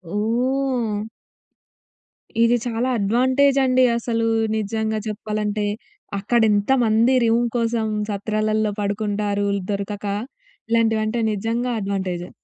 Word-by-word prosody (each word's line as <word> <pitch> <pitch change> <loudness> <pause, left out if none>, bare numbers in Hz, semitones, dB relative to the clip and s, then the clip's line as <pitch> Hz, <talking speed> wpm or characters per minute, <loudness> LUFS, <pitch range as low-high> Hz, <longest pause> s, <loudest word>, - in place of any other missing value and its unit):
ఓహ్! 235 -1 0 1.4
ఇది 235 +1 +4
చాలా 240 +1 -1
అడ్వాంటేజ్ 260 +7 +3
అండి 255 0 +4
అసలు. 230 -1 -1 0.3
నిజంగా 220 +1 -1
చెప్పాలంటే. 210 0 -2 0.5
అక్కడ 235 +4 +1
ఎంతమంది 225 +2 +3
రూమ్ 230 +1 +2
కోసం 230 -1 0 0.2
సత్రాలలో 215 +1 0
పడుకుంటారు 205 0 -1
ఇది 190 - -6
దొరకక. 200 +1 -4 0.6
ఇలాంటివి 225 -1 +3
అంటే 225 +2 -1
నిజంగా 230 +4 -1
అడ్వాంటేజే. 190 -3 -3
220 Hz, 95 wpm, -22 LUFS, 205-235 Hz, 1.4 s, ఇది